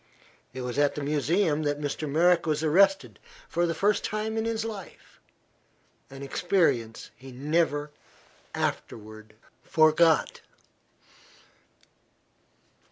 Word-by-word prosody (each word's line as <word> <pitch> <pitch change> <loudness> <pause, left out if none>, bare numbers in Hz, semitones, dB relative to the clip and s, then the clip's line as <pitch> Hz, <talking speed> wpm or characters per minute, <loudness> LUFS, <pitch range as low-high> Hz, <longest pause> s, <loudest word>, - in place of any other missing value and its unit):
It 130 +1 -7
was 125 +2 -3
at 145 -1 +2
the 150 - -4
Museum 150 +3 +1
that 145 -1 -1
Mr. 145 +1 -4
Merrick 170 +3 +3
was 155 0 0
arrested 195 +5 +2 0.3
for 175 +1 0
the 165 - -2
first 200 +4 +1
time 215 +1 -3
in 220 0 -1
his 225 -1 -2
life, 210 -4 -9 0.9
an 135 +1 -10
experience 135 - 0
he 130 +1 -13
never 145 +2 -1 0.6
afterward 110 0 -5 0.3
forgot. 155 0 +3
155 Hz, 105 wpm, -27 LUFS, 140-180 Hz, 0.9 s, Merrick